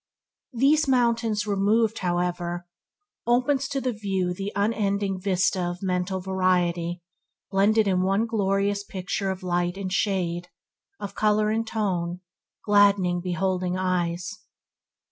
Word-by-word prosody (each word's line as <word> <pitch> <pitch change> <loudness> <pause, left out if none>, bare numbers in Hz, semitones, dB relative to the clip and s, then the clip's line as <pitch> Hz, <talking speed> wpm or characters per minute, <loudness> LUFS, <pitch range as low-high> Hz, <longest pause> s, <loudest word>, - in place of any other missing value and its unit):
These 280 +5 +3
mountains 235 -4 +2
removed, 210 +2 +1
however, 175 -1 -2 0.6
there 240 - +4
opens 270 +2 +1
to 275 0 -2
the 255 -2 -1
view 195 -4 -1
the 195 +3 -4
unending 200 -2 0
vista 185 -1 +1
of 175 +1 -3
mental 185 0 -1
variety 180 -2 0 0.5
blended 210 +2 +3
in 185 -2 +2
one 195 +4 +2
glorious 200 -2 0
picture 195 0 -3
of 190 0 -4
light 175 0 -1
and 190 -2 -4
shade, 175 -4 0 0.5
of 200 - -6
colour 215 0 +2
and 225 +1 -1
tone, 180 -5 -2 0.4
gladdening 200 -4 +4
beholding 185 0 -1
eyes. 180 +2 -1
195 Hz, 125 wpm, -25 LUFS, 180-210 Hz, 0.6 s, there